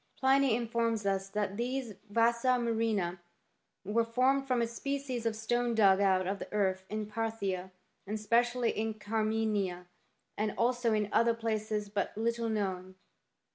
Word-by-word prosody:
Pliny 270 -2 +4
informs 230 -2 -1
us 195 0 0
that 205 -1 -2
these 250 -1 -2 0.2
vasa 235 +3 +3
murrhina 220 -7 0 0.7
were 220 +4 +2
formed 260 +4 +2
from 255 -2 +2
a 235 - +2
species 255 0 -3
of 225 - -1
stone 240 +2 0
dug 200 -3 +5
out 190 -2 +3
of 195 +2 -2
the - - -8
earth 190 -2 0
in 215 0 -3
Parthia, 210 -4 -3 0.4
and 210 - -2
especially 235 +3 +2
in 220 0 -2
Carimania, 215 -4 -1 0.5
and 210 0 -1
also 240 -1 +2
in 210 -1 +1
other 230 0 +3
places 215 -2 -2
but 200 0 -3
little 230 +1 0
known. 190 -3 -2
220 Hz, 145 wpm, -31 LUFS, 205-235 Hz, 0.7 s, dug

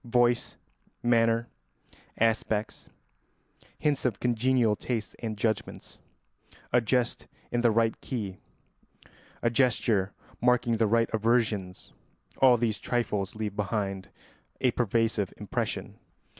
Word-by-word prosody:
Voice, 120 0 +1 0.5
manner, 115 -1 +3 0.7
aspect, 110 -1 0 0.9
hints 150 -3 0
of 120 -6 0
congenial 120 -2 +2
tastes 115 -1 -3
and 110 -2 -4
judgments, 110 +1 -3 0.7
a 125 - +5
jest 120 +1 0 0.2
in 120 - +1
the 120 - +4
right 115 0 +1
key, 100 -8 -4 1.0
a 120 - +3
gesture 115 -5 +2 0.3
marking 120 -1 +3
the 110 0 +3
right 115 +2 +2
aversions, 110 -4 0 0.5
all 130 -2 +6
these 110 -2 0
trifles 105 -5 -1
leave 105 -2 -4
behind 100 -2 -2 0.5
a 125 - +3
pervasive 115 -3 0
impression. - - -4
115 Hz, 105 wpm, -28 LUFS, 105-120 Hz, 1.0 s, all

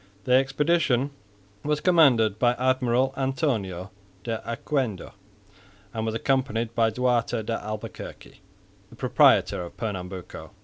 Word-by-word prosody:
The 125 - -3
expedition 135 0 +2 0.5
was 150 0 0
commanded 130 - +4
by 120 +1 +4
Admiral 130 0 +1
Antonio 115 - -2 0.3
de 115 -2 -3
Oquendo, 120 -5 -2 0.8
and 110 0 -2
was 110 - -2
accompanied 120 -2 0
by 115 -1 +3
Duarte 120 -1 0
de 115 +1 -3
Albuquerque, 110 0 -8 0.5
the - - -15
proprietor - - +3
of 85 - -9
Pernambuco. 95 -4 -6
120 Hz, 115 wpm, -25 LUFS, 110-135 Hz, 0.8 s, commanded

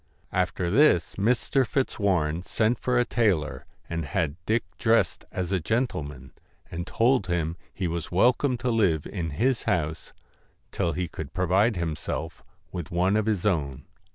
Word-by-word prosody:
After 90 -1 0
this 105 - +4
Mr. 125 +5 +2
Fitzwarren 95 - 0
sent 110 +5 0
for 125 -1 +1
a 120 - +3
tailor, 95 -13 0 0.2
and 85 -1 -3
had 85 -7 -1
Dick 115 +2 +2 0.2
dressed 115 -1 +2
as 90 0 -3
a 95 - +2
gentleman, 75 - -2 0.4
and 85 +2 -4
told 120 -3 +2
him 85 -2 -1 0.2
he 95 - -3
was 85 -1 -4
welcome 125 +7 +3
to 125 +1 -1
live 90 -10 +2
in 85 -5 -4
his 115 - 0
house 80 -1 -1 0.6
till 85 - 0
he 90 +1 -2
could 80 -1 -8
provide 95 +5 +3
himself 80 -5 -4 0.3
with 85 -4 -5
one 90 +3 +2
of 110 0 +1
his 105 -4 0
own. 70 -8 0
90 Hz, 155 wpm, -26 LUFS, 80-115 Hz, 0.6 s, this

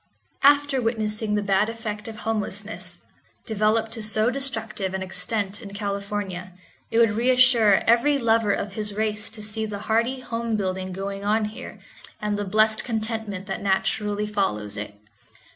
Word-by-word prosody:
After 285 -1 +5
witnessing 215 -2 -1
the 210 - 0
bad 200 +2 +2
effect 220 -2 -5
of 220 -1 -8
homelessness, 205 -4 -3 0.5
developed 220 +1 +1
to 225 -1 -5
so 215 +2 +2
destructive 225 -8 -3
an 190 - -2
extent 195 +2 -1
in 200 -1 -9
California, 200 -3 -3 0.4
it 225 - 0
would 230 -2 +6
reassure 240 -2 +5
every 240 +6 +4
lover 225 -4 +3
of 200 0 -2
his 210 -1 -3
race 215 0 -1
to 220 -1 -7
see 215 +1 -4
the 210 -1 -4
hearty 235 +4 +1
home 230 -2 -2
building 190 -2 -2
going 195 +1 -4
on 215 +1 +2
here 210 +1 -8 0.4
and 210 -1 -1
the 205 0 -2
blessed 215 +2 +3
contentment 220 -4 -3
that 195 - -4
naturally 205 +1 0
follows 105 - -1
it. 105 0 -5
215 Hz, 155 wpm, -24 LUFS, 200-225 Hz, 0.5 s, would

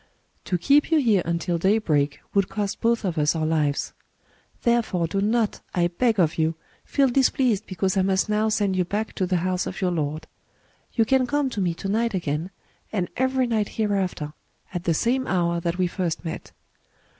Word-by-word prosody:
To 180 - 0
keep 280 - +3
you 325 - +4
here 225 -10 +3
until 170 0 -1
daybreak 160 -8 +1
would 195 -2 +2
cost 205 -2 -3
both 230 -1 +1
of 175 -4 -1
us 150 +2 +2
our 160 -1 0
lives. 150 -3 0 0.7
Therefore 235 -8 +2
do 195 +4 -1
not, 220 +1 +1
I 175 -1 +2
beg 220 +4 +1
of 165 -2 +2
you, 160 +1 +1 0.3
feel 275 -2 +2
displeased 250 -4 +2
because 185 +1 -1
I 195 - +3
must 190 +1 +1
now 215 +1 +1
send 205 -3 +1
you 185 - +2
back 210 +5 -3
to 185 - -1
the 180 0 +1
house 185 -1 0
of 185 - -6
your 185 -3 +1
lord. 155 -1 -2 0.7
You 225 - +3
can 260 +2 +2
come 290 -1 0
to 210 - -2
me 175 -3 0
to 195 - -5
night 225 +2 0
again, 160 0 -2 0.4
and 185 -5 -1
every 260 0 +1
night 220 -4 0
here 215 -2 +1
after, 180 -6 -2 0.4
at 175 -1 -4
the 165 - +2
same 255 +7 +1
hour 170 -2 +1
that 170 +1 -2
we 185 - +2
first 175 -2 -3
met. 160 - -6
190 Hz, 195 wpm, -24 LUFS, 170-225 Hz, 0.7 s, you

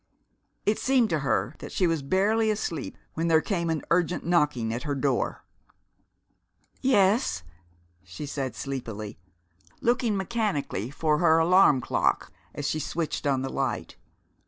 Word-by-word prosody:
It 210 - +2
seemed 255 -4 +2
to 160 - +1
her 135 0 0
that - - -8
she 185 - +1
was 165 -3 +1
barely 205 +9 +2
asleep 170 -8 -3 0.2
when 165 +1 -1
there 160 -1 +5
came 170 -1 -1
an 160 -2 -1
urgent 175 0 +1
knocking 150 -10 +1
at 120 - -3
her 145 0 -2
door. 135 0 -1 1.4
"Yes?" 205 - +3 0.6
she 90 +10 -8
said 135 -4 -4
sleepily, 115 -8 -5 0.6
looking 235 -3 +1
mechanically 190 - -2
for 150 +1 0
her 165 -2 +5
alarm 165 -5 +5
clock 120 - 0 0.2
as 145 - -3
she 155 - -1
switched 155 -1 -2
on 135 -2 +1
the 135 - -3
light. 120 -10 -2
160 Hz, 140 wpm, -27 LUFS, 135-190 Hz, 1.4 s, there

